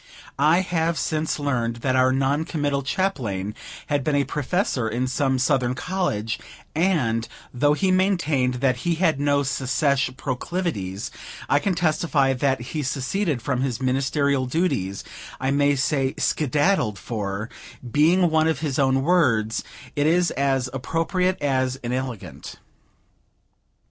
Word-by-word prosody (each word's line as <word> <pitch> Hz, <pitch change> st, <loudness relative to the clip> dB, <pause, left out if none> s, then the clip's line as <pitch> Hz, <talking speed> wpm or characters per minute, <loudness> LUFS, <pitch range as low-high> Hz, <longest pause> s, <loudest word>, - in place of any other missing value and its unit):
I 155 Hz, +5 st, +5 dB
have 170 Hz, -2 st, 0 dB
since 155 Hz, 0 st, -1 dB
learned 120 Hz, -6 st, -1 dB
that 130 Hz, -1 st, +2 dB
our 130 Hz, 0 st, +4 dB
non 135 Hz, +3 st, +1 dB
committal 145 Hz, -4 st, -1 dB
Chaplain 125 Hz, -, -2 dB, 0.3 s
had 145 Hz, -2 st, 0 dB
been 150 Hz, 0 st, +1 dB
a 140 Hz, -, +3 dB
Professor, 145 Hz, -, -1 dB
in 125 Hz, +3 st, -1 dB
some 130 Hz, 0 st, +1 dB
Southern 130 Hz, -1 st, +1 dB
College; 115 Hz, -, -2 dB, 0.3 s
and, 145 Hz, -10 st, +1 dB, 0.3 s
though 145 Hz, +4 st, +3 dB
he 190 Hz, +3 st, +1 dB
maintained 165 Hz, -9 st, +2 dB
that 130 Hz, -2 st, +3 dB
he 170 Hz, +7 st, 0 dB
had 160 Hz, -4 st, +1 dB
no 145 Hz, 0 st, +2 dB
secesh 135 Hz, +1 st, +1 dB
proclivities, 130 Hz, -, -3 dB, 0.4 s
I 145 Hz, -, +3 dB
can 190 Hz, +3 st, 0 dB
testify 155 Hz, -5 st, +2 dB
that 130 Hz, -1 st, 0 dB
he 155 Hz, -, -1 dB
seceded 145 Hz, -, -1 dB
from 130 Hz, -1 st, -1 dB
his 130 Hz, -4 st, -1 dB
ministerial 135 Hz, +1 st, +1 dB
duties, 125 Hz, -, -1 dB, 0.4 s
I 130 Hz, +1 st, 0 dB
may 145 Hz, 0 st, +3 dB
say, 135 Hz, -1 st, 0 dB
skedaddled; 145 Hz, -, +1 dB
for, 100 Hz, +1 st, -4 dB, 0.4 s
being 165 Hz, +5 st, +4 dB
one 160 Hz, 0 st, +3 dB
of 160 Hz, -, 0 dB
his 145 Hz, -4 st, -1 dB
own 135 Hz, -1 st, +3 dB
words, 125 Hz, -10 st, +2 dB, 0.3 s
it 145 Hz, +1 st, +2 dB
is 175 Hz, +2 st, +3 dB
as 135 Hz, -2 st, 0 dB
appropriate 175 Hz, +7 st, 0 dB
as 130 Hz, -2 st, +1 dB
inelegant. 120 Hz, -, -5 dB
140 Hz, 135 wpm, -23 LUFS, 125-160 Hz, 0.4 s, I